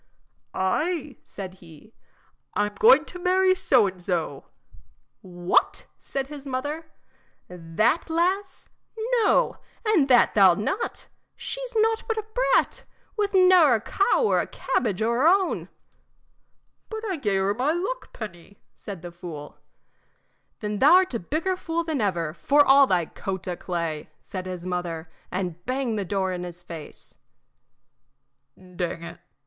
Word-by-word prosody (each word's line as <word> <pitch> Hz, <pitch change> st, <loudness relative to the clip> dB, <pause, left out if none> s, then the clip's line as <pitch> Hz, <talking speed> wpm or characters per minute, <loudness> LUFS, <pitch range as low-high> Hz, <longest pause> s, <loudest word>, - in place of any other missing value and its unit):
"Ay," 300 Hz, -, -1 dB
said 190 Hz, -2 st, -8 dB
he, 170 Hz, +6 st, -16 dB, 0.6 s
"I'm 205 Hz, 0 st, 0 dB
going 465 Hz, +2 st, +7 dB
to 360 Hz, -, -10 dB
marry 370 Hz, +1 st, +3 dB
so 260 Hz, -, +3 dB
an' 185 Hz, -1 st, -7 dB
so." 170 Hz, -6 st, -3 dB, 0.8 s
"What!" 175 Hz, -1 st, 0 dB
said 275 Hz, -1 st, -4 dB
his 285 Hz, 0 st, -9 dB
mother, 290 Hz, +5 st, -4 dB, 0.6 s
"that 180 Hz, -, 0 dB
lass? 370 Hz, +4 st, -1 dB, 0.5 s
No, 415 Hz, -, +2 dB, 0.3 s
and 390 Hz, -11 st, +3 dB
that 250 Hz, -3 st, +5 dB
thou 195 Hz, -4 st, +7 dB
'lt -, -, -5 dB
not. 380 Hz, -, -3 dB, 0.3 s
She's -, -, -6 dB
nought 445 Hz, +1 st, +2 dB
but 450 Hz, -2 st, -1 dB
a 435 Hz, -, -3 dB
brat, -, -, +2 dB, 0.3 s
with 410 Hz, -2 st, -1 dB
ne'er 365 Hz, -8 st, +6 dB
a -, -, 0 dB
cow 400 Hz, -, +1 dB
or 440 Hz, -, +3 dB
a -, -, -5 dB
cabbage 215 Hz, -4 st, -1 dB
o' 225 Hz, -, +1 dB
her 250 Hz, +6 st, +3 dB
own." 380 Hz, +1 st, +2 dB, 1.2 s
"But 440 Hz, 0 st, -5 dB
I 380 Hz, -, -1 dB
gave 205 Hz, -8 st, 0 dB
her 195 Hz, +1 st, +1 dB
my 255 Hz, +7 st, 0 dB
luck 390 Hz, +10 st, -3 dB
penny," 200 Hz, -2 st, -9 dB, 0.2 s
said 195 Hz, -5 st, -9 dB
the 175 Hz, -, -7 dB
fool. 165 Hz, -4 st, -9 dB, 1.0 s
"Then 210 Hz, -1 st, -3 dB
thou 300 Hz, +7 st, +7 dB
'rt 370 Hz, -6 st, +2 dB
a 235 Hz, -, -1 dB
bigger 320 Hz, -, -1 dB
fool 335 Hz, -2 st, -2 dB
than 315 Hz, -6 st, -2 dB
ever, 170 Hz, -6 st, -1 dB
for 280 Hz, -, +3 dB
all 275 Hz, 0 st, +7 dB
thy 180 Hz, -5 st, +2 dB
coat 190 Hz, +3 st, -6 dB
o' 180 Hz, -, -2 dB
clay!" 170 Hz, -4 st, -4 dB
said 185 Hz, -1 st, -7 dB
his 180 Hz, -1 st, -6 dB
mother, 175 Hz, -3 st, -4 dB, 0.2 s
and 175 Hz, -2 st, -4 dB
banged 255 Hz, -4 st, -1 dB
the 200 Hz, -, -2 dB
door 190 Hz, -1 st, -1 dB
in 180 Hz, 0 st, -4 dB
his 175 Hz, 0 st, -9 dB
face. 165 Hz, -3 st, -10 dB, 1.4 s
"Dang 180 Hz, -2 st, -5 dB
it!" 170 Hz, -, -9 dB
220 Hz, 150 wpm, -25 LUFS, -, 1.4 s, going